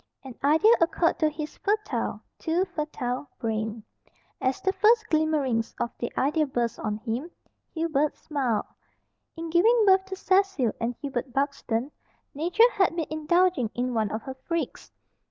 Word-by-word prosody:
An 265 -2 -8
idea 320 +11 +5
occurred 335 0 +2
to 310 - +3
his 305 0 -7
fertile 420 +1 -1 0.2
too 345 +3 +1
fertile 290 -6 -4
brain. 220 -1 -3 0.6
As 260 0 0
the 380 - 0
first 440 +4 +4
glimmerings 295 -8 +1
of 235 - -1
the 240 - -3
idea 300 +3 +2
burst 240 -3 -2
on 210 -1 -2
him, 235 +8 -4 0.5
Hubert 310 -3 0
smiled. 260 -8 -1 0.7
In 330 0 -5
giving 440 +7 +5
birth 380 -1 +5
to 385 0 -6
Cecil 380 - +2
and 235 +1 -1
Hubert 260 -2 -3
Buxton, 275 -2 -1 0.4
Nature 355 - +4
had 380 -6 +2
been 330 -2 -1
indulging 315 -4 +2
in 250 +1 -1
one 220 -3 +1
of 220 +1 -4
her 265 - -6
freaks. 320 +6 -4
300 Hz, 150 wpm, -26 LUFS, 245-350 Hz, 0.7 s, idea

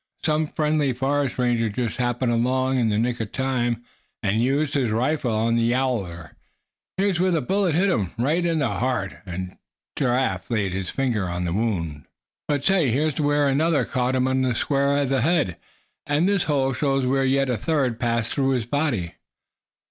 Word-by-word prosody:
Some 155 0 +1
friendly 150 -3 0
forest 135 +2 -1
ranger 120 -3 +1
just 115 +2 -3
happened 120 0 0
along 130 +2 +1
in 115 -2 +2
the 105 - +1
nick 120 +2 0
of 110 -3 -4
time, 120 -3 -1 0.4
and 105 +2 +1
used 140 +4 +1
his 130 -5 +1
rifle 125 +3 0
on 115 +2 +1
the - - +2
yowler. 115 -9 -1 0.7
Here's 195 -2 +1
where 185 +1 +3
the 170 -3 +2
bullet 185 +3 0
hit 190 +4 +3
him, 100 - 0
right 150 +9 +1
in 165 -1 +1
the 140 -4 +1
heart," 120 -8 -2
and 90 +1 -6 0.4
Giraffe 125 -8 0
laid 105 -5 0
his 95 0 -3
finger 115 -9 -1
on 90 +1 -3
the 85 - -1
wound. 85 - -2 0.4
"But 145 -2 -1
say, 190 -8 +3
here's 150 +5 0
where 145 0 +2
another 145 -1 +2
caught 130 0 -1
him 130 0 +2
on 130 0 +1
the 125 -2 +1
square 140 +2 +1
head, 135 - +1 0.5
and 145 +5 +2
this 200 -2 +2
hole 135 -3 +1
shows 135 0 0
where 135 +1 +2
yet 135 0 +2
a - - +1
third 130 -5 0
passed 115 -2 0
through 135 -1 +1
his 120 -4 -1
body. 120 - -1
130 Hz, 180 wpm, -23 LUFS, 115-145 Hz, 0.7 s, where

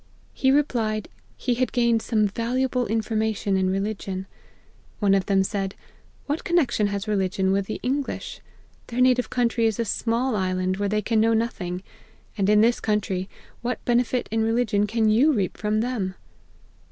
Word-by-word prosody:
He 265 - +1
replied, 230 -7 +1 0.3
he 250 - 0
had 250 +1 0
gained 235 -2 +2
some 215 -2 +1
valuable 250 +4 -1
information 220 -2 0
in 190 -1 +2
religion. 195 -1 -3 0.7
One 200 -2 +3
of 195 -1 +1
them 195 -2 +3
said, 195 0 -3 0.2
' - - -32
What 295 +3 -2
connexion 275 -11 +2
has 200 +1 -3
religion 190 -2 +1
with 195 0 0
the 215 - -4
English? 270 +2 -3 0.5
Their 240 +1 -4
native 250 -1 +3
country 235 -2 +1
is 220 -1 -2
a 230 - +1
small 230 +4 0
island, 185 -1 0
where 200 0 -1
they 210 +1 0
can 225 +1 +1
know 225 0 +3
nothing; 190 -6 -2 0.5
and 200 -2 +1
in 210 0 +5
this 235 +2 +3
country, 200 -3 -1 0.3
what 245 +1 -3
benefit 245 +1 +1
in 225 0 +1
religion 220 -2 +1
can 220 +1 +1
you 250 +9 +4
reap 195 -7 -1
from 210 +3 0
them 220 -6 -2
220 Hz, 165 wpm, -24 LUFS, 195-240 Hz, 0.7 s, in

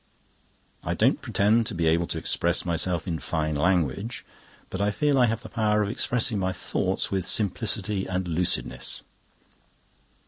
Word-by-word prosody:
I - - -2
don't - - +2
pretend 110 +3 +2
to - - -2
be 85 -1 0
able 85 +2 +2
to - - -3
express 85 +2 0
myself 85 +1 0
in 85 -3 -2
fine 80 -2 -2
language, 90 - 0 0.5
but 95 - -3
I 100 - +2
feel 145 +5 +1
I 125 - +5
have 115 +1 -2
the - - -7
power 105 -2 +1
of 100 - -2
expressing 115 -2 +1
my 95 0 -1
thoughts 90 - -1
with 95 -2 0
simplicity 105 -1 0
and 95 -1 -2
lucidness. 80 -8 0
95 Hz, 160 wpm, -26 LUFS, 85-110 Hz, 0.5 s, I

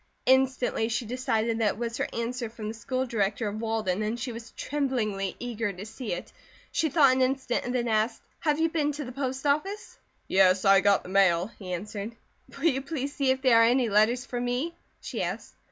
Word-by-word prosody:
Instantly 260 -3 +2
she 235 +1 -1
decided 230 -2 -1
that 210 -3 +2
it - - -15
was 230 0 -3
her - - -1
answer 235 0 -3
from 220 -1 -7
the 215 - -3
School 255 +4 -2
Director 215 -2 -1
of 210 +2 -4
Walden 220 -4 -1
and 215 +3 -2
she 245 +1 -3
was 230 0 -8
tremblingly 230 -9 -2
eager 230 -3 -3
to 195 +1 -8
see 225 +1 -6
it. 175 - -5 0.4
She 320 -2 +1
thought 280 -2 +5
an 260 - +1
instant 260 -1 0
and 245 +1 -2
then 240 -1 0
asked: 220 +1 0 0.2
"Have 300 -1 +1
you 325 - +4
been 310 -2 0
to 295 0 -5
the 250 - -7
post 265 +1 -3
office?" 310 +9 -1 0.3
"Yes, 185 0 +4
I 195 -1 +7
got 200 -1 +3
the - - -10
mail," 190 0 +3
he 185 -3 -7
answered. 205 +4 -5 0.4
"Will 280 - -4
you 270 -5 +3
please 280 -1 -4
see 275 -2 0
if 260 +1 +1
there 235 -3 +6
are - - +7
any 245 0 +3
letters 220 +5 +3
for 245 -2 -4
me?" 250 +7 -1 0.3
she - - -4
asked. - - -4
235 Hz, 215 wpm, -27 LUFS, 215-265 Hz, 0.4 s, I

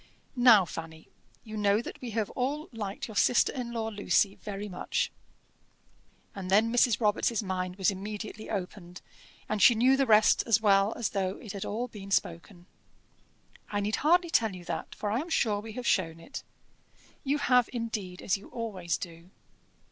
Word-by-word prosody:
"Now, 240 -6 +7
Fanny, 160 -1 -9 0.3
you 220 -1 -8
know 205 0 +2
that 235 - -8
we 250 - -5
have 220 -2 -2
all 285 +5 -2
liked 210 -4 -5
your 220 - -10
sister 235 +4 +3
in 245 -3 -4
law, 225 -1 -2
Lucy, 205 -1 +1
very 205 0 -6
much." 180 -3 -2 1.2
And 190 -2 -6
then 220 +4 +3
Mrs. 245 -2 +3
Robarts' 215 0 +1
mind 185 -1 -3
was 195 +1 +2
immediately 210 +2 -7
opened, 180 -3 -6 0.4
and 215 -1 -2
she 240 - +7
knew 255 +4 +4
the 270 -1 +1
rest 215 -1 +5
as 230 -1 +4
well 200 -1 +3
as 235 - -1
though 190 -1 -2
it 215 - -9
had 200 - -5
all 235 +4 -3
been 200 -4 -10
spoken. 175 -1 -2 1.0
"I 205 - -1
need 205 +1 -1
hardly 340 +3 +3
tell 220 - +2
you 175 -1 -11
that, - - -5
for 205 - -3
I 225 - +1
am 325 +5 -5
sure 215 -10 +1
we 220 +1 -8
have 250 +1 -6
shown 165 -6 +1
it." 270 +12 -8 0.8
"You 280 +1 +1
have, 250 -4 +3
indeed, 220 -7 -5
as 190 - +1
you 195 - -14
always 195 -8 -3
do." 170 0 -9
210 Hz, 180 wpm, -29 LUFS, 195-235 Hz, 1.2 s, Now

